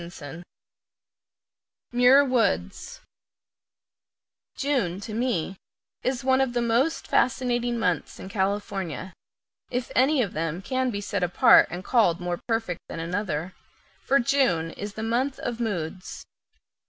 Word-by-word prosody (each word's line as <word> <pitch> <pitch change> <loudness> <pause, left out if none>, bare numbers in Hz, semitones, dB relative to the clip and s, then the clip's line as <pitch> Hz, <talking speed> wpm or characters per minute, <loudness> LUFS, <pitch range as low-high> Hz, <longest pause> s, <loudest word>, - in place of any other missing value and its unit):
Muir 250 +3 +6
Woods 225 - -1 1.5
June, 255 -11 -1
to 215 +2 -7
me, 210 -6 -1 0.4
is 255 +1 -2
one 260 0 +3
of 260 -2 0
the 240 - 0
most 245 +8 +1
fascinating 240 -1 +1
months 180 -6 -1
in - - -8
California 195 -3 -3 0.6
if 250 -1 -3
any 265 +1 +4
of 200 - -5
them 165 +1 -2
can 260 +3 0
be 205 -4 -3
set 200 -1 -3
apart 180 0 +6
and 175 +1 -6
called 195 -6 +3
more 175 -1 -3
perfect 225 -7 -1
than - - -6
another 175 -1 -3 0.5
for 275 - +3
June 235 -11 +1
is 205 +3 -7
a 220 - -3
month 250 +4 0
of 240 -1 -4
moods. 185 -5 -4
225 Hz, 125 wpm, -25 LUFS, 180-250 Hz, 1.5 s, Muir